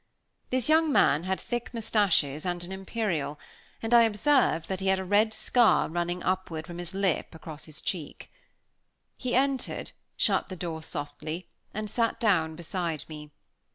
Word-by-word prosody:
This 255 -1 +1
young 315 0 +4
man 160 - +4
had 190 0 -1
thick 240 0 -4
moustaches 195 -10 +2
and 175 -1 -2
an 175 - -8
imperial, 190 -7 -2 0.4
and 225 +1 0
I 235 - +9
observed 230 - +3
that 190 -1 -3
he 195 - -2
had 190 0 +4
a 190 - -4
red 205 +3 +3
scar 225 -2 +3
running 175 +2 -2
upward 180 -4 -1
from 175 0 -8
his 175 +2 -5
lip 195 -4 0
across 155 -1 -8
his 155 -1 -9
cheek. 165 -6 -5 0.8
He 250 -2 -2
entered, 270 0 0 0.3
shut - - +2
the 185 - -5
door 165 -3 -4
softly, 155 +2 -5 0.2
and 215 +1 -4
sat 230 +2 0
down 165 -8 +2
beside 170 -1 -3
me. 150 -1 -9
185 Hz, 160 wpm, -28 LUFS, 160-220 Hz, 0.8 s, I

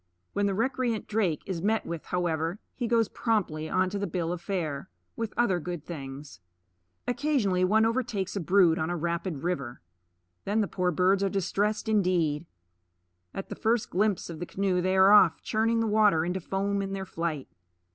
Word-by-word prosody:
When 205 0 +1
the 195 - 0
recreant 240 0 -1
drake 200 -8 0
is 185 -4 -3
met 220 +3 +1
with, 170 -2 -5
however, 170 0 -1 0.2
he 245 - -3
goes 230 -2 +3
promptly 165 -9 -1
onto 185 +2 0
the 200 - -1
bill 170 -1 -2
of 175 - -6
fare, 165 -7 -3 0.3
with 225 -2 -3
other 195 -7 +2
good 175 -2 -6
things. 140 - -8 0.7
Occasionally 245 -9 +1
one 215 +4 +4
overtakes 225 -5 -1
a - - 0
brood 175 -1 +4
on 160 - -1
a 175 - -1
rapid 170 -2 -3
river. 140 -9 -3 0.6
Then 210 +3 0
the 205 - 0
poor 180 -1 0
birds 185 +3 +2
are 195 - +2
distressed 200 +3 -1
indeed. 175 -7 +1 0.8
At 195 - -6
the - - -5
first 225 0 0
glimpse 205 0 +1
of 165 -2 -7
the 175 - -5
canoe 190 -2 0
they 185 +1 +1
are 190 +1 +7
off, 190 -5 +6
churning 225 +1 +1
the - - +1
water 210 -7 +3
into 180 +2 -2
foam 200 +2 -1
in 195 0 -4
their 195 -1 -4
flight. 165 -5 -3
190 Hz, 180 wpm, -28 LUFS, 170-210 Hz, 0.8 s, are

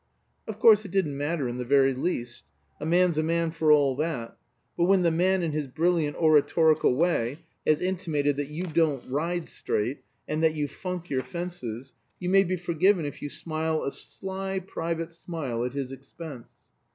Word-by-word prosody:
Of 220 -2 -5
course 215 -1 +6
it 200 - -8
didn't 175 -6 0
matter 145 0 -1
in 120 +1 -4
the - - -1
very 135 +1 +4
least. 125 -4 -3 0.4
A - - -4
man's 175 -1 +3
a - - +2
man 165 0 0
for 160 -1 +2
all 140 -3 +5
that; 140 -7 -3 0.4
but 170 - +2
when 190 0 +4
the 170 - +3
man, 180 +2 +2
in 165 - 0
his 150 -1 -2
brilliant 160 +1 +1
oratorical 155 -2 +4
way, 150 -3 +1 0.3
has 155 +2 +3
intimated 165 -6 0
that 145 -1 -2
you 155 +4 -4
don't 160 -5 +1
ride 165 +5 -2
straight, 120 +7 -2 0.3
and 155 +1 -1
that 160 -1 +3
you 150 -1 -1
funk 180 +3 -6
your 130 -1 +1
fences, 135 -8 -6 0.3
you 180 - -2
may 195 0 +6
be 185 0 -1
forgiven 175 0 +2
if 145 - -6
you 145 - -4
smile 160 +1 -2
a 140 - -2
sly 190 +3 -5
private 165 -3 -3
smile 150 -9 -4
at 125 +1 -3
his 135 -2 -3
expense. 135 -1 -9
160 Hz, 185 wpm, -27 LUFS, 140-175 Hz, 0.4 s, course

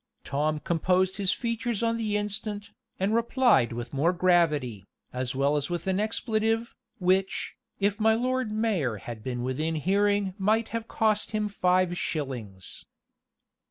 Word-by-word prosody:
Tom 150 +2 0
composed 180 +4 +1
his 195 -2 +2
features 230 -1 -2
on 230 0 +2
the 215 -2 0
instant, 205 0 -4 0.3
and 195 +3 +1
replied 235 - +3
with 120 +2 -6
more 150 +5 +3
gravity, 150 - +2 0.3
as 125 0 -2
well 140 +2 +2
as 145 -1 -1
with 175 -1 -3
an 190 0 +1
expletive, 225 +1 0 0.2
which, 190 0 +1 0.2
if 200 +2 +1
my 220 0 +4
Lord 255 -1 0
Mayor 210 - 0
had 115 +2 -8
been 125 -1 -3
within 150 +6 -1
hearing 200 +4 +1
might 215 +3 +2
have 230 0 -4
cost 215 0 0
him 210 0 0
five 185 -2 +2
shillings. 120 - -4
190 Hz, 145 wpm, -27 LUFS, 150-215 Hz, 0.3 s, my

